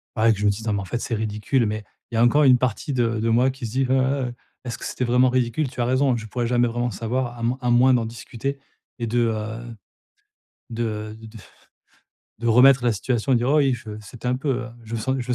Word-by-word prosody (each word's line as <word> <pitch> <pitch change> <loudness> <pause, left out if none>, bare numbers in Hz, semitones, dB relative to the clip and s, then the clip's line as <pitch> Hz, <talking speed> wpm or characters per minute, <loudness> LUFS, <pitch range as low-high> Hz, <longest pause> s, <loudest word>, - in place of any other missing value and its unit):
voilà, 115 0 +4
que 105 - 0
je 105 - -1
me - - +5
dise: 105 +3 -6
«Non 110 - 0
mais 100 - 0
en - - -7
fait 120 +6 -3
c'est 115 - -2
ridicule» 110 +4 0
mais 105 0 -3 0.3
il - - -4
y - - +1
a 115 - +5
encore 145 +5 +4
une 130 -2 +6
partie 130 +3 -2
de 115 -3 0
de 115 - 0
moi 125 +3 +4
qui 130 -1 -7
se - - -8
dit: 135 +2 +1
«Heu - - +1
heu, 130 -1 +1 0.3
est-ce 120 -2 -5
que - - -8
c'était 125 - -2
vraiment 125 +2 +4
ridicule?», 130 +4 0
tu 125 -2 -5
as - - +1
raison, 130 +2 +2
hein, - - 0
je 110 - -7
pourrais 120 +2 -2
jamais 120 0 +2
vraiment 120 +1 -2
savoir 120 +3 -3
à - - -9
m 120 +2 0
à 125 - 0
moins 125 +2 +5
d'en 120 -2 +2
discuter 120 +4 -5 0.4
et 115 - -2
de, 120 +2 0
heu, 115 +1 -2 1.0
de 110 -2 -4
de 115 - -11
de 110 +1 -12 1.0
de 120 - -3
remettre 125 +2 +6
la 120 - +3
situation 120 +4 -1
et - - +5
dire: 120 +2 0
«Oh, 150 - +4
oui, 135 -3 +3
je 110 -3 -8
c'était 110 +4 -7
un 125 - +1
peu, 140 +2 -2 0.2
heu, 120 - -10
je 115 +1 -6
me - - -1
sen 130 +3 -1
je 120 - -6
me 125 - +1
120 Hz, 275 wpm, -23 LUFS, 115-130 Hz, 1.0 s, une